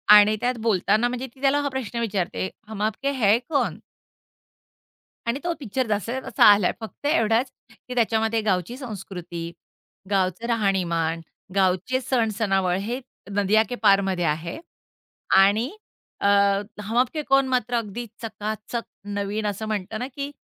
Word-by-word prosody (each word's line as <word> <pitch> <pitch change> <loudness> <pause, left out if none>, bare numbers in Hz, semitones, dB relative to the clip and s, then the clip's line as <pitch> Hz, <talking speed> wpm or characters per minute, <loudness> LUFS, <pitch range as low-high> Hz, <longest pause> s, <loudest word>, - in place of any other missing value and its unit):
आणि 210 +1 +7
त्यात 250 +1 +1
बोलताना 215 +1 +2
म्हणजे 250 +2 -4
ती 265 - -19
त्याला 280 +1 +3
हा 285 - -1
प्रश्न 250 -4 -4
विचारते, 195 -4 -1 0.2
हम 215 -2 -6
आपके 220 +6 0
है 225 -6 +4
कौन? 290 -3 0 1.5
आणि 235 +3 0
तो 345 - +1
पिक्चर 260 0 -2
जसाच्या 215 +5 -1
तसा - - +4
आलाय, 200 -3 +3
फक्त 225 +5 -7
एवढाच 230 -3 +2 0.4
की 250 - -4
त्याच्यामध्ये 225 -1 +2
गावची 190 +2 0
संस्कृती, 180 -8 -7 0.6
गावचं 190 +2 0
राहणीमान, 180 -7 0 0.3
गावचे 190 +6 +2
सण-सणावळ 210 -7 +1
हे 235 +6 -3 0.3
नदिया 205 +2 +3
के - - -3
पारमध्ये 195 -3 +3
आहे 165 +2 -2 0.8
आणि 205 +6 +4 0.5
अ, - - +5 0.6
हम 215 +3 -4
आप 250 0 +4
के 315 - -5
है - - 0
कौन 270 0 +4
मात्र 245 -2 0
अगदी 230 +1 -3 0.2
चकाचक 220 +1 -4 0.3
नवीन 205 +2 -2
असं 205 +1 -3
म्हणतं 215 0 -3
ना, 250 - -3
की 280 +1 -5
215 Hz, 145 wpm, -24 LUFS, 195-245 Hz, 1.5 s, आणि